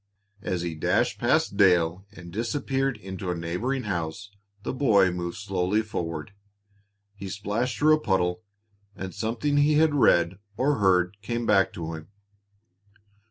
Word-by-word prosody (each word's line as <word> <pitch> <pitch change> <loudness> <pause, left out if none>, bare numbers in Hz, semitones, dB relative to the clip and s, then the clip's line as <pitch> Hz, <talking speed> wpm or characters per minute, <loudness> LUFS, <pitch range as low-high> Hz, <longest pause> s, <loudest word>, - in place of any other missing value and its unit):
As 90 -4 -2
he 85 -1 -3
dashed 80 - 0
past 100 - +1
Dale 90 -1 +3
and 90 -4 -12
disappeared 135 +3 -1
into 95 -2 -6
a 90 - -1
neighboring 90 +11 -2
house, 95 0 -4 0.3
the - - -3
boy 110 -9 +4
moved 85 -1 -4
slowly 100 +2 0
forward. 85 -5 -5 0.8
He 100 -1 -8
splashed 105 +6 -2
through 155 +1 +5
a - - -9
puddle, 95 -5 0 0.5
and 95 -1 -6
something 120 - -1
he 145 +1 +4
had 155 0 +4
read, 90 -9 +3 0.2
or 140 -1 +1
heard, 95 -1 +2
came 120 +1 -3
back 100 -2 +3
to 85 -4 -5
him. 80 0 -8
100 Hz, 145 wpm, -26 LUFS, 90-120 Hz, 0.8 s, through